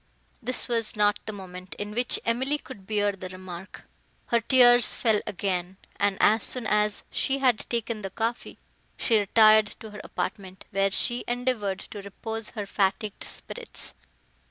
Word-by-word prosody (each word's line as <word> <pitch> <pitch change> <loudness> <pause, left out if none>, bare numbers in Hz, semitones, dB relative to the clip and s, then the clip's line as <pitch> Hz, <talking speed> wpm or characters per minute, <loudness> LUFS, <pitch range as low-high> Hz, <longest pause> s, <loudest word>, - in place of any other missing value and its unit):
This 250 +1 0
was 230 -3 0
not 205 -1 +2
the - - -2
moment, 185 -2 -9
in 205 0 -5
which 245 +3 +1
Emily 260 +5 +1
could 205 -10 -12
bear 205 -1 +1
the 185 -2 -8
remark; 185 0 -10 0.4
her 235 -1 +3
tears 245 -1 +5
fell 220 -3 +2
again, 185 -1 -3 0.2
and, 200 -1 +1
as 215 +1 +4
soon 250 -3 +7
as 210 -1 +1
she 270 0 0
had 255 -5 +1
taken 230 -2 -2
the 195 - -5
coffee, 230 +4 -3 0.4
she 225 -3 +3
retired 215 +1 +5
to 220 - -10
her 210 - -8
apartment, 190 -2 -5
where 195 0 +2
she 240 +5 +1
endeavoured 240 -6 -1
to 205 - -9
repose 220 +3 -6
her 210 -4 -5
fatigued 200 +1 -1
spirits. 480 -2 -4
210 Hz, 155 wpm, -26 LUFS, 195-235 Hz, 0.4 s, soon